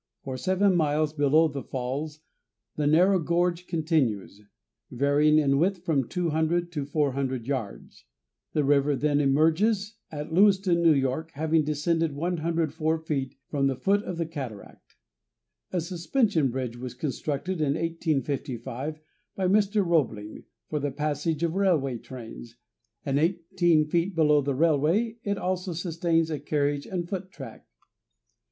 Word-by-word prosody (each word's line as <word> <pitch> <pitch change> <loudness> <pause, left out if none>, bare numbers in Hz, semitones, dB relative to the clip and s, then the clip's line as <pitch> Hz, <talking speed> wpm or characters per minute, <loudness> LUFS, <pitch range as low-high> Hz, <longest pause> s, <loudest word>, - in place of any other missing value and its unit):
For 130 - -5
seven 185 +8 +2
miles 155 -2 +1
below 155 +2 +4
the 140 -2 -5
falls 140 +5 -4 0.5
the 150 -1 0
narrow 180 +5 +4
gorge 175 +1 0
continues, 140 - -1 0.5
varying 145 +4 +3
in 140 -2 +3
width 180 +1 0
from 140 -7 +1
200 170 0 0
to 145 -5 -3
400 135 -4 -1
yards. 130 -6 -5 0.5
The 150 - +2
river 140 0 +3
then 145 +1 +1
emerges 190 +10 +2
at 150 +1 -6
Lewiston, 190 -2 +4
N. 145 -4 +4
Y., 135 +4 -1
having 155 +2 +1
descended 155 +1 0
104 160 -1 -1
feet 145 -5 -3
from 140 -1 0
the 135 - 0
foot 200 +10 +1
of 180 -5 -6
the 165 - -1
cataract. 135 -10 -9 0.8
A 180 - 0
suspension 175 - 0
bridge 125 -1 -4
was 125 0 -7
constructed 150 +6 -3
in 145 -1 +1
1855 150 -4 -3 0.4
by 190 -1 0
Mr. 205 +1 +2
Roebling, 120 -11 -1 0.2
for 150 - -2
the 145 0 -1
passage 150 +3 -2
of 165 -1 0
railway 160 -11 +1
trains, 120 -1 -10 0.5
and 140 0 +1
eighteen 170 -1 +2
feet 170 +4 0
below 150 -2 +4
the 140 -1 -1
railway 165 - +2
it 200 -1 -1
also 185 -1 -2
sustains 165 -1 0
a 150 - -2
carriage 145 0 -1
and 175 -3 -3
foot 185 0 -5
track. - - -11
155 Hz, 140 wpm, -27 LUFS, 140-175 Hz, 0.8 s, below